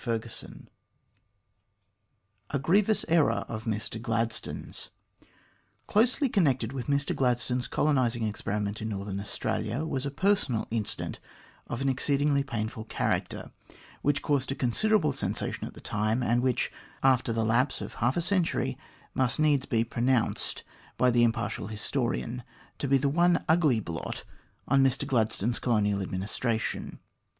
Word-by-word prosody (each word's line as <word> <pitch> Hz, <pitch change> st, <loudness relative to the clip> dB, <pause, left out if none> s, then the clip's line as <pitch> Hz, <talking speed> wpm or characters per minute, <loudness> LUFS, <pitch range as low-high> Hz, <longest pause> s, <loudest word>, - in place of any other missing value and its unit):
CHAPTER 115 Hz, -2 st, -2 dB
XIII -, -, -6 dB, 1.8 s
A 140 Hz, -, 0 dB
GRIEVOUS 200 Hz, +10 st, +3 dB
ERROR 165 Hz, -3 st, +3 dB
OF 110 Hz, 0 st, -5 dB
MR 110 Hz, 0 st, -3 dB
GLADSTONE'S 115 Hz, -1 st, -2 dB, 1.0 s
CLOSELY 245 Hz, +6 st, +3 dB
connected 135 Hz, -, +1 dB
with 130 Hz, -3 st, -4 dB
Mr 140 Hz, 0 st, +1 dB
Gladstone's 125 Hz, -1 st, +1 dB
colonising 130 Hz, -6 st, +1 dB
experi 105 Hz, -1 st, -2 dB
ment 100 Hz, +2 st, -3 dB
in 110 Hz, -, -2 dB
Northern 100 Hz, -1 st, -3 dB
Australia 110 Hz, +6 st, -2 dB
was 135 Hz, -5 st, -2 dB
a -, -, -1 dB
personal 145 Hz, -, +1 dB
incident 110 Hz, -2 st, -2 dB, 0.5 s
of 120 Hz, -, -4 dB
an 135 Hz, -, +2 dB
exceedingly 140 Hz, +2 st, +2 dB
painful 110 Hz, -4 st, -4 dB
character, -, -, -2 dB, 0.5 s
which 145 Hz, 0 st, +1 dB
caused 140 Hz, -3 st, +1 dB
a -, -, -1 dB
considerable 155 Hz, -, +2 dB
sensation 135 Hz, -, -2 dB
at -, -, -11 dB
the -, -, -10 dB
time, 110 Hz, +4 st, 0 dB
and 120 Hz, 0 st, +2 dB
which, 125 Hz, -1 st, +1 dB, 0.3 s
after 130 Hz, -2 st, +4 dB
the 115 Hz, 0 st, 0 dB
lapse 125 Hz, +5 st, +2 dB
of -, -, -6 dB
half 120 Hz, +6 st, +2 dB
a 170 Hz, -, +1 dB
century, 180 Hz, -1 st, 0 dB, 0.3 s
must 130 Hz, -3 st, +1 dB
needs 145 Hz, -3 st, +3 dB
be 115 Hz, -5 st, +2 dB
pronounced 120 Hz, +1 st, 0 dB, 0.3 s
by 125 Hz, -1 st, +4 dB
the 120 Hz, 0 st, +4 dB
impartial 115 Hz, -3 st, 0 dB
historian 120 Hz, +2 st, -2 dB, 0.4 s
to 140 Hz, -, -1 dB
be 135 Hz, +1 st, +5 dB
the 140 Hz, +2 st, +1 dB
one 170 Hz, +4 st, +3 dB
ugly 155 Hz, -7 st, +4 dB
blot 85 Hz, -6 st, -5 dB, 0.4 s
on 135 Hz, +1 st, +4 dB
Mr 135 Hz, 0 st, +2 dB
Gladstone's 115 Hz, -1 st, +1 dB
colonial 105 Hz, -4 st, +2 dB
adminis 95 Hz, +1 st, -3 dB
tration. 115 Hz, -3 st, -1 dB
125 Hz, 140 wpm, -28 LUFS, 110-140 Hz, 1.8 s, be